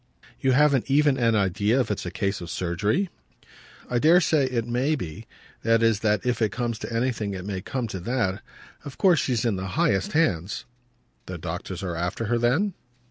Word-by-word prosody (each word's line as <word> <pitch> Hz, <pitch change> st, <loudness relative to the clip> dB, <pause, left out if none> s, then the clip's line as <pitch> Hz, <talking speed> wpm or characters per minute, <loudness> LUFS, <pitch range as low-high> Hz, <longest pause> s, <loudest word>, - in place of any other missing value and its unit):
"You 130 Hz, -1 st, +2 dB
haven't 140 Hz, -2 st, +3 dB
even 145 Hz, 0 st, +4 dB
an 115 Hz, -2 st, +3 dB
idea 100 Hz, +4 st, +2 dB
if 125 Hz, -, 0 dB
it's 95 Hz, -, -3 dB
a -, -, -2 dB
case 100 Hz, +2 st, -2 dB
for 85 Hz, -, -7 dB
surgery?" 100 Hz, -, -1 dB, 0.8 s
"I 120 Hz, -, 0 dB
dare 165 Hz, +6 st, +6 dB
say 155 Hz, -5 st, +2 dB
it 120 Hz, -3 st, -1 dB
may 125 Hz, +6 st, 0 dB
be; 90 Hz, -, -7 dB, 0.3 s
that 115 Hz, 0 st, +3 dB
is 115 Hz, -3 st, +3 dB
that 105 Hz, 0 st, +1 dB
if 120 Hz, -2 st, 0 dB
it 110 Hz, -3 st, +2 dB
comes 115 Hz, 0 st, -3 dB
to -, -, -6 dB
anything 115 Hz, -4 st, -1 dB
it 90 Hz, 0 st, -6 dB
may 95 Hz, -2 st, -3 dB
come 130 Hz, +4 st, -3 dB
to 95 Hz, -, -5 dB
that. 105 Hz, -1 st, -1 dB, 0.4 s
Of 140 Hz, -, -9 dB
course 180 Hz, -6 st, +4 dB
she's 120 Hz, -3 st, 0 dB
in 110 Hz, -5 st, +1 dB
the 95 Hz, +1 st, -4 dB
highest 95 Hz, -2 st, +1 dB
hands." 100 Hz, -, 0 dB, 0.6 s
"The 95 Hz, -, -5 dB
doctors 90 Hz, +3 st, -5 dB
are 90 Hz, -3 st, -3 dB
after 90 Hz, +7 st, -2 dB
her 120 Hz, +2 st, +1 dB
then?" 145 Hz, -, +2 dB
115 Hz, 195 wpm, -25 LUFS, 95-130 Hz, 0.8 s, dare